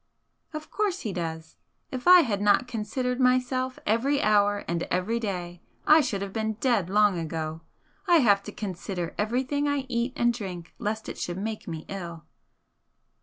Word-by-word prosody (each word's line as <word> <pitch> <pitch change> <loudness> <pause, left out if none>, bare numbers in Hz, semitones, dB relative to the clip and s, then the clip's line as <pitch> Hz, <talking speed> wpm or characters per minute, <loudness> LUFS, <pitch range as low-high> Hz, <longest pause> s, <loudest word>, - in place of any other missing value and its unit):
"Of 310 -1 -7
course 405 -3 -1
he 210 - -3
does. 160 -2 -5 0.3
If 255 +2 -5
I 360 0 +10
had 210 -9 -1
not 205 +4 +3
considered 245 +2 -2
myself 255 0 +1
every 260 +7 +2
hour 205 -2 +2
and 170 0 -1
every 185 +6 0
day, 180 -5 -4 0.2
I 310 +1 +7
should 200 -8 -2
have 195 -1 -6
been 220 -1 -1
dead 215 -5 +1
long 205 -2 +3
ago. 160 0 -4 0.5
I 350 - +6
have 210 -10 +5
to 210 - -6
consider 185 -4 -5
everything 260 +7 0
I 285 -2 0
eat 240 +1 -1
and 240 0 +2
drink 180 -7 -7
lest 220 +1 -3
it - - -6
should 175 0 -3
make 215 +2 -4
me 160 -2 -6
ill." 170 -5 -7
210 Hz, 170 wpm, -27 LUFS, 185-250 Hz, 0.5 s, I